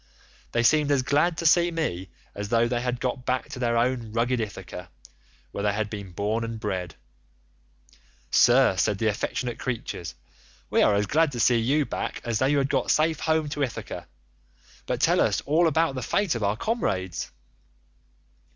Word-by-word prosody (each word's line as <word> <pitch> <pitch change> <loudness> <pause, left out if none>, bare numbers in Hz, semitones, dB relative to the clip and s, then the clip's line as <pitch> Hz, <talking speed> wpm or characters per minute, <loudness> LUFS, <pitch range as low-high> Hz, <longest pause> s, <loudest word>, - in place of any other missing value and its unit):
They 120 - +1
seemed 150 +4 +4
as 140 -3 +2
glad 150 +5 +2
to 170 - -4
see 170 +2 +5
me 125 - -3 0.2
as 100 0 -5
though 115 +1 +3
they 120 0 -1
had 125 0 -2
got 125 0 -2
back 130 0 -1
to - - -7
their 120 -2 +1
own 120 -2 0
rugged 120 +2 +1
Ithaca, 95 -4 -6 0.6
where 100 - -4
they 105 -1 +1
had 105 0 -2
been 100 -3 -7
born 105 +5 -1
and 115 -1 -5
bred. 95 -5 -4 1.4
'Sir,' 125 -5 +5
said 100 +1 +1
the 110 - -2
affectionate 115 +3 -2
creatures, 115 -9 -4 0.6
'we - - +3
are 105 - +4
as 100 +1 +1
glad 155 +7 +2
to 120 - -4
see 120 +1 +4
you 140 +6 +1
back - - -4
as 115 -2 -1
though 130 - +2
we 145 - +2
had 140 -1 +1
got - - 0
safe 155 0 +2
home 160 -1 +1
to 145 - -4
Ithaca; 135 -4 -4 0.8
but - - -1
tell - - +3
us - - +2
all 165 +4 +2
about 160 -1 +2
the 130 - -4
fate 200 - 0
of 115 - -4
our 100 +1 0
comrades. 95 - -2
120 Hz, 185 wpm, -25 LUFS, 105-145 Hz, 1.4 s, see